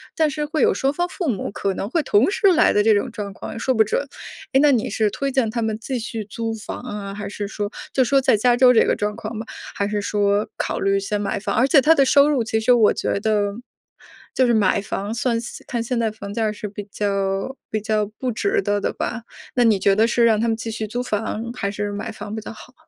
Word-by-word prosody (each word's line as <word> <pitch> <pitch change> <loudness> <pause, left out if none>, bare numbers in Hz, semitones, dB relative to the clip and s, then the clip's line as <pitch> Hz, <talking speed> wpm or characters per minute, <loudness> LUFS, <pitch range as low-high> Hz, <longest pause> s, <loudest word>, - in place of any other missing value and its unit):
但 315 -1 +2
是 300 +1 -2
会 310 +1 -2
有 - - +4
双 270 +1 0
方 350 +3 -1
父 360 -4 -4
母 210 -6 -2
可 200 -1 -2
能 195 +3 -4
会 330 - +1
同 240 - +3
时 405 - +2
来 320 - +4
的 210 - +3
这 220 +1 +4
种 205 - 0
状 200 -2 -6
况 - - -8
也 225 - -7
说 260 - +1
不 220 - +5
准。 275 +6 -2 0.5
诶， 270 - +5
那 295 -1 +5
你 235 -4 +1
是 215 0 0
推 275 +5 -2
荐 260 -4 +1
他 235 +1 -2
们 220 -1 -1
继 250 +3 -4
续 225 -1 -5
租 225 +2 -4
房 215 - -7
啊， 205 -5 -6
还 205 0 -6
是 205 0 -5
说 205 -1 -3 0.2
就 265 - +1
说 275 +2 +3
在 225 - +3
加 240 +3 +3
州 250 0 +6
这 225 - +5
个 - - +2
状 210 0 -2
况 225 +1 -6
嘛， 220 +1 -5 0.3
还 200 - 0
是 210 -1 -1
说 205 0 +1
考 - - -2
虑 195 0 +2
先 205 +1 -2
买 205 -1 -2
房？ 205 - -3
而 255 +4 +3
且 275 -2 +6
他 320 +3 +6
的 275 -3 +4
收 280 +2 +5
入 255 -6 +1
其 220 0 0
实 220 - +3
我 235 -4 +5
觉 - - -1
得 205 -1 +1 0.8
就 255 - +3
是 240 - +3
买 205 -4 +3
房 205 +1 -4
算 235 0 0 0.3
看 235 -2 -2
现 235 +1 -2
在 225 -1 +1
房 200 -2 -8
价 225 0 0
儿 210 - 0
是 210 0 -6
比 205 0 -8
较 195 +4 -2
比 215 -1 -2
较 215 0 0
不 255 -2 -2
值 400 - 0
得 205 - 0
的 - - -2
吧， 225 0 -4 0.3
那 245 -2 +4
你 220 -3 +4
觉 195 +1 +2
得 220 +1 +4
是 235 0 +2
让 220 -2 +4
他 230 - +1
们 225 - +1
继 225 0 -5
续 220 -1 -4
租 245 +4 -3
房 225 0 -3
还 200 -5 -2
是 205 0 -3
买 205 +3 -5
房 215 -1 -7
比 220 - -4
较 220 - -8
好？ 250 +3 -14
220 Hz, 285 characters per minute, -22 LUFS, 205-250 Hz, 0.8 s, 州